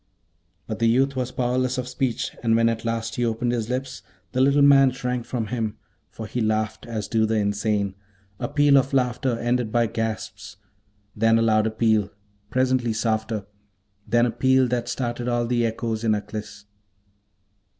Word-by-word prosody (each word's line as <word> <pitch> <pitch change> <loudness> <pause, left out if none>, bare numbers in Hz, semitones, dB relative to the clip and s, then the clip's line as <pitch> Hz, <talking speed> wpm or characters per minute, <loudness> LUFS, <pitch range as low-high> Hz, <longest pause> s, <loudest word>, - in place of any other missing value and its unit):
But 110 - -5
the 115 - +3
youth 135 +3 +2
was 130 -1 -2
powerless 125 +1 0
of 125 -1 -3
speech, 130 0 -2
and 115 -1 +2
when 115 0 +4
at 115 -1 -3
last 115 0 -3
he 120 - 0
opened 120 +1 0
his 115 -2 -2
lips, 130 +1 -3 0.3
the 130 - +1
little 140 +1 +4
man 135 -1 +7
shrank 125 -1 -3
from 120 -3 -2
him, 110 -3 -2 0.3
for 110 - -8
he 120 +3 -3
laughed 110 +1 -1
as 110 -3 -4
do 110 -1 +1
the 110 - 0
insane, 100 -1 0 0.5
a 120 - -2
peal 145 0 +4
of 135 +1 -2
laughter 125 -1 +1
ended 120 -1 -1
by 120 0 +3
gasps; 115 -1 -4 0.6
then 115 +1 +3
a 115 - +2
louder 110 -1 +3
peal, 110 -2 +1 0.4
presently 130 -2 +1
softer; 110 -2 -1 0.6
then 120 0 +3
a 120 - 0
peal 130 +1 +3
that 120 -1 -1
started 120 -1 -3
all 120 -1 +1
the 120 -1 +1
echoes 115 0 -3
in 110 -2 +3
Aklis. 105 0 -7
115 Hz, 170 wpm, -24 LUFS, 110-125 Hz, 0.6 s, man